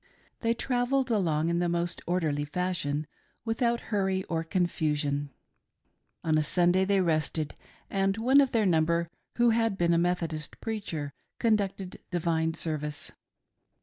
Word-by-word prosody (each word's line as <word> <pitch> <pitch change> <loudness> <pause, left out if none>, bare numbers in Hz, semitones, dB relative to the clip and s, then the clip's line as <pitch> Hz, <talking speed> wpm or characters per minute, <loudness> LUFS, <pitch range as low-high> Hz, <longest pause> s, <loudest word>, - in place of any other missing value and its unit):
They 230 0 +1
travelled 250 +1 0
along 165 -7 +1
in 170 0 +1
the 175 0 +1
most 170 0 -1
orderly 160 -5 0
fashion, 155 -3 -2 0.4
without 235 +1 +1
hurry 190 -2 +1
or 165 -2 -2
confusion. 150 -5 0 0.9
On 155 -1 +3
Sunday 175 +4 +3
they 195 0 +3
rested, 155 -2 0 0.3
and 195 +1 0
one 260 +5 +5
of 270 - +1
their 220 -3 +2
number 170 -1 +2 0.3
who 240 -1 +4
had 225 -3 +1
been 170 -1 +3
a 170 - +3
Methodist 170 -3 -2
preacher 165 -10 -4 0.2
conducted 200 -5 0
divine 165 -2 0
service. 150 -2 -4
175 Hz, 130 wpm, -29 LUFS, 160-205 Hz, 0.9 s, one